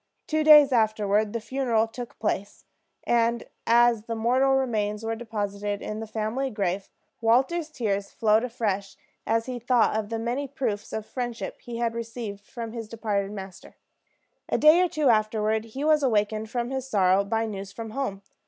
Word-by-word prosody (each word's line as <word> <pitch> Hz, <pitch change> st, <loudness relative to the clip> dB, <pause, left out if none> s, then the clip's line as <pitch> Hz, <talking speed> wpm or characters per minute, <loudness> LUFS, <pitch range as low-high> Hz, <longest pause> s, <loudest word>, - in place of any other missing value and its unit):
Two 310 Hz, 0 st, 0 dB
days 300 Hz, -2 st, +8 dB
afterward 215 Hz, -2 st, +2 dB
the 230 Hz, -, -2 dB
funeral 235 Hz, -2 st, 0 dB
took 240 Hz, +1 st, -9 dB
place; 205 Hz, -1 st, -3 dB, 0.4 s
and 235 Hz, 0 st, +1 dB, 0.2 s
as 235 Hz, -1 st, +4 dB
the 230 Hz, -, -3 dB
mortal 255 Hz, +4 st, +3 dB
remains 215 Hz, -5 st, -1 dB
were 225 Hz, -, -1 dB
deposited 205 Hz, -3 st, -3 dB
in 215 Hz, 0 st, -4 dB
the 225 Hz, -, -6 dB
family 220 Hz, +5 st, -2 dB
grave, 195 Hz, -3 st, -2 dB, 0.3 s
Walter's 265 Hz, +9 st, +2 dB
tears 205 Hz, -8 st, -2 dB
flowed 220 Hz, 0 st, +2 dB
afresh 210 Hz, -5 st, -2 dB, 0.3 s
as 225 Hz, 0 st, +1 dB
he 250 Hz, -1 st, -5 dB
thought 240 Hz, -2 st, +2 dB
of 215 Hz, -1 st, -2 dB
the 230 Hz, -, -2 dB
many 240 Hz, +5 st, -2 dB
proofs 240 Hz, -6 st, -3 dB
of 220 Hz, -1 st, -4 dB
friendship 240 Hz, -1 st, -5 dB
he 235 Hz, -1 st, -7 dB
had 235 Hz, -1 st, 0 dB
received 225 Hz, -3 st, -6 dB
from 230 Hz, -2 st, -6 dB
his 230 Hz, -2 st, -6 dB
departed 205 Hz, -3 st, -2 dB
master. 190 Hz, -2 st, -9 dB, 0.7 s
A -, -, +1 dB
day 310 Hz, +4 st, +6 dB
or 365 Hz, -, +3 dB
two 305 Hz, -3 st, 0 dB
afterward 215 Hz, 0 st, +1 dB
he 260 Hz, +6 st, -6 dB
was 305 Hz, 0 st, +4 dB
awakened 215 Hz, -3 st, 0 dB
from 240 Hz, +1 st, -2 dB
his 265 Hz, -1 st, -3 dB
sorrow 195 Hz, -4 st, +3 dB
by 225 Hz, +3 st, -1 dB
news 195 Hz, -2 st, -6 dB
from 225 Hz, +1 st, -7 dB
home. 215 Hz, -6 st, -3 dB
225 Hz, 170 wpm, -26 LUFS, 210-245 Hz, 0.7 s, days